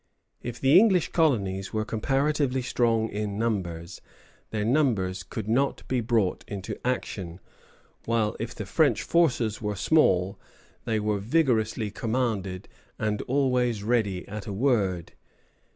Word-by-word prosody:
If 120 Hz, -1 st, -6 dB
the 140 Hz, +6 st, +6 dB
English 190 Hz, -6 st, +3 dB
colonies 100 Hz, -, +1 dB
were 110 Hz, 0 st, -1 dB
comparatively 135 Hz, +3 st, 0 dB
strong 115 Hz, -3 st, +1 dB
in 105 Hz, -1 st, -3 dB
numbers, 90 Hz, -7 st, -3 dB, 0.5 s
their 105 Hz, -1 st, -2 dB
numbers 110 Hz, -9 st, +1 dB
could 105 Hz, +4 st, -6 dB
not 130 Hz, +5 st, 0 dB
be 130 Hz, -2 st, 0 dB
brought 110 Hz, -5 st, 0 dB
into 100 Hz, -2 st, -5 dB
action; 95 Hz, -8 st, -3 dB, 0.7 s
while 115 Hz, -2 st, +1 dB
if 115 Hz, +1 st, -5 dB
the 105 Hz, -, -5 dB
French 140 Hz, +10 st, +2 dB
forces 125 Hz, -11 st, +1 dB
were 105 Hz, -1 st, -2 dB
small, 95 Hz, -, +2 dB, 0.5 s
they 110 Hz, -2 st, 0 dB
were 105 Hz, -1 st, 0 dB
vigorously 110 Hz, -3 st, +1 dB
commanded, 105 Hz, -5 st, -2 dB, 0.3 s
and 105 Hz, -1 st, -1 dB
always 125 Hz, -5 st, +1 dB
ready 105 Hz, -5 st, 0 dB
at 105 Hz, 0 st, -7 dB
a 100 Hz, -, -4 dB
word. 100 Hz, -7 st, 0 dB
110 Hz, 130 wpm, -26 LUFS, 100-125 Hz, 0.7 s, the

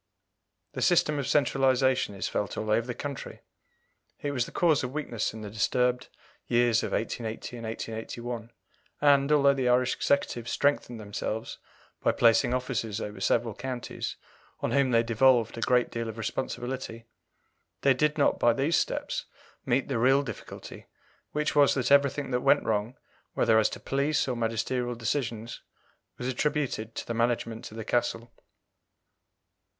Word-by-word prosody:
The -, -, -4 dB
system 150 Hz, -4 st, +3 dB
of 140 Hz, -, -2 dB
centralization 130 Hz, -5 st, +2 dB
is 95 Hz, -, -2 dB
felt 100 Hz, -3 st, -3 dB
all 110 Hz, 0 st, -2 dB
over 115 Hz, +2 st, +2 dB
the 120 Hz, -, -4 dB
country. 140 Hz, -3 st, -6 dB, 0.8 s
It 145 Hz, -, -2 dB
was 125 Hz, -4 st, -1 dB
the -, -, -10 dB
cause 160 Hz, -5 st, +2 dB
of 125 Hz, +1 st, -4 dB
weakness 130 Hz, -7 st, -2 dB
in 110 Hz, -, -9 dB
the 105 Hz, -, -6 dB
disturbed 125 Hz, +3 st, +1 dB, 0.4 s
years 120 Hz, -1 st, +3 dB
of -, -, -3 dB
1880 115 Hz, +1 st, -3 dB
and 115 Hz, -, -7 dB
1881, 115 Hz, +1 st, -5 dB, 0.5 s
and, 140 Hz, 0 st, +4 dB
although 140 Hz, -2 st, +5 dB
the 130 Hz, -2 st, 0 dB
Irish 125 Hz, +1 st, +3 dB
Executive 120 Hz, -4 st, 0 dB
strengthened 140 Hz, -5 st, 0 dB
themselves 105 Hz, +1 st, -4 dB, 0.4 s
by -, -, +3 dB
placing 115 Hz, +1 st, +4 dB
officers 115 Hz, -4 st, -2 dB
over 105 Hz, -2 st, -6 dB
several 115 Hz, +3 st, +1 dB
counties, 125 Hz, +1 st, -5 dB, 0.4 s
on -, -, -2 dB
whom 140 Hz, -2 st, +3 dB
they 115 Hz, -1 st, +4 dB
devolved 115 Hz, 0 st, +3 dB
a 115 Hz, -, -6 dB
great 125 Hz, 0 st, +2 dB
deal 115 Hz, -1 st, -3 dB
of 110 Hz, -, -8 dB
responsibility, 120 Hz, 0 st, -4 dB, 0.8 s
they 140 Hz, -, +5 dB
did 150 Hz, +4 st, +1 dB
not 145 Hz, -, +2 dB
by 120 Hz, -, +4 dB
these 140 Hz, +7 st, +1 dB
steps -, -, -2 dB, 0.4 s
meet 130 Hz, +3 st, +1 dB
the 130 Hz, -4 st, -1 dB
real 135 Hz, +4 st, +4 dB
difficulty, 110 Hz, -7 st, -9 dB, 0.4 s
which 150 Hz, 0 st, -1 dB
was 145 Hz, -1 st, +5 dB
that 130 Hz, 0 st, 0 dB
everything 140 Hz, -1 st, +3 dB
that 125 Hz, 0 st, +1 dB
went 140 Hz, +2 st, +4 dB
wrong, 110 Hz, +3 st, -1 dB, 0.4 s
whether 110 Hz, -1 st, +4 dB
as 110 Hz, -, +3 dB
to -, -, -7 dB
police 140 Hz, +2 st, 0 dB
or 125 Hz, -, -1 dB
magisterial 120 Hz, +2 st, -1 dB
decisions, 115 Hz, -1 st, -3 dB, 0.6 s
was 125 Hz, -, -4 dB
attributed 130 Hz, -5 st, -1 dB
to -, -, -4 dB
the 115 Hz, -, -3 dB
management 115 Hz, -1 st, -1 dB
of 110 Hz, -, -11 dB
the 110 Hz, -, -5 dB
Castle. 115 Hz, -1 st, -1 dB
125 Hz, 155 wpm, -28 LUFS, 115-135 Hz, 0.8 s, although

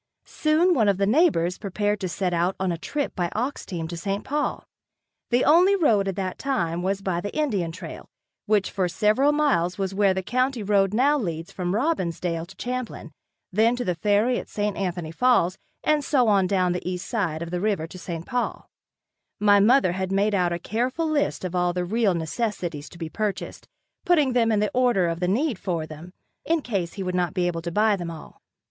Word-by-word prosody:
Soon 320 Hz, +4 st, +2 dB
one 220 Hz, -9 st, +3 dB
of 195 Hz, -, +2 dB
the 200 Hz, -, +2 dB
neighbors 210 Hz, -, +2 dB
prepared 205 Hz, +1 st, -1 dB
to 185 Hz, -, -3 dB
set 180 Hz, 0 st, -1 dB
out 175 Hz, +2 st, +1 dB
on 190 Hz, -1 st, 0 dB
a 170 Hz, -, -2 dB
trip 285 Hz, -, -3 dB
by 175 Hz, -1 st, -1 dB
ox 250 Hz, +6 st, -3 dB
team 165 Hz, -3 st, -4 dB
to 170 Hz, -, -6 dB
St. 195 Hz, +4 st, -3 dB
Paul. 295 Hz, +1 st, -2 dB, 0.6 s
The 245 Hz, +1 st, +2 dB
only 360 Hz, +6 st, +6 dB
road 225 Hz, -, +3 dB
at 195 Hz, -, -2 dB
that 185 Hz, -2 st, -4 dB
time 175 Hz, -11 st, -1 dB
was 195 Hz, +2 st, -1 dB
by 175 Hz, -3 st, -1 dB
the 205 Hz, -, -5 dB
Indian 205 Hz, -, 0 dB
trail, 170 Hz, -1 st, -9 dB, 0.4 s
which 205 Hz, -2 st, +2 dB
for 190 Hz, -3 st, 0 dB
several 215 Hz, +10 st, +3 dB
miles 270 Hz, -, +1 dB
was 195 Hz, -1 st, -2 dB
where 195 Hz, -1 st, +3 dB
the 190 Hz, -, -2 dB
county 255 Hz, +2 st, 0 dB
road 195 Hz, -1 st, +2 dB
now 280 Hz, +7 st, +3 dB
leads 165 Hz, -6 st, -4 dB
from 180 Hz, 0 st, -2 dB
Robbinsdale 175 Hz, -, -1 dB
to 190 Hz, -, -14 dB
Champlin. 250 Hz, -9 st, -5 dB, 0.4 s
Then 225 Hz, +4 st, +3 dB
to 245 Hz, -, -3 dB
the 180 Hz, -, +1 dB
ferry 210 Hz, +7 st, +2 dB
at -, -, -9 dB
St. 210 Hz, -1 st, -2 dB
Anthony 175 Hz, -4 st, -3 dB
Falls, 190 Hz, -3 st, +2 dB, 0.2 s
and 305 Hz, -1 st, +2 dB
so 260 Hz, -4 st, +2 dB
on 200 Hz, -3 st, +3 dB
down 185 Hz, -2 st, +1 dB
the 180 Hz, 0 st, -3 dB
east 180 Hz, 0 st, -4 dB
side 170 Hz, -9 st, -1 dB
of 170 Hz, -, -7 dB
the 180 Hz, 0 st, -2 dB
river 200 Hz, -6 st, 0 dB
to 180 Hz, +3 st, -11 dB
St. 170 Hz, -1 st, -6 dB
Paul. 250 Hz, -2 st, -3 dB, 0.7 s
My 205 Hz, -1 st, +5 dB
mother 225 Hz, -1 st, +4 dB
had 190 Hz, +1 st, -3 dB
made 200 Hz, +2 st, +2 dB
out 180 Hz, -3 st, +2 dB
a 170 Hz, -, -1 dB
careful 245 Hz, -, -2 dB
list 290 Hz, -10 st, 0 dB
of 180 Hz, -, -3 dB, 0.2 s
the 180 Hz, 0 st, -1 dB
real 210 Hz, -1 st, +1 dB
necessities 170 Hz, -3 st, -3 dB
to -, -, -14 dB
be 165 Hz, -2 st, -5 dB
purchased, 210 Hz, +2 st, -4 dB, 0.4 s
putting 300 Hz, -7 st, +3 dB
them 230 Hz, -2 st, +3 dB
in 210 Hz, -1 st, +2 dB
the 210 Hz, -, 0 dB
order 245 Hz, -8 st, +3 dB
of 165 Hz, 0 st, -2 dB
the 180 Hz, -, 0 dB
need 235 Hz, -, 0 dB
for 170 Hz, -4 st, -2 dB
them, 155 Hz, +3 st, -10 dB, 0.3 s
in 330 Hz, -2 st, 0 dB
case 195 Hz, -8 st, -2 dB
he 195 Hz, -, -5 dB
would 180 Hz, -1 st, -3 dB
not 180 Hz, 0 st, 0 dB
be 180 Hz, -2 st, +1 dB
able 170 Hz, -1 st, -1 dB
to 170 Hz, +1 st, -4 dB
buy 210 Hz, +3 st, +3 dB
them 175 Hz, -3 st, -5 dB
all. 165 Hz, -2 st, -11 dB
195 Hz, 210 wpm, -24 LUFS, 175-245 Hz, 0.7 s, only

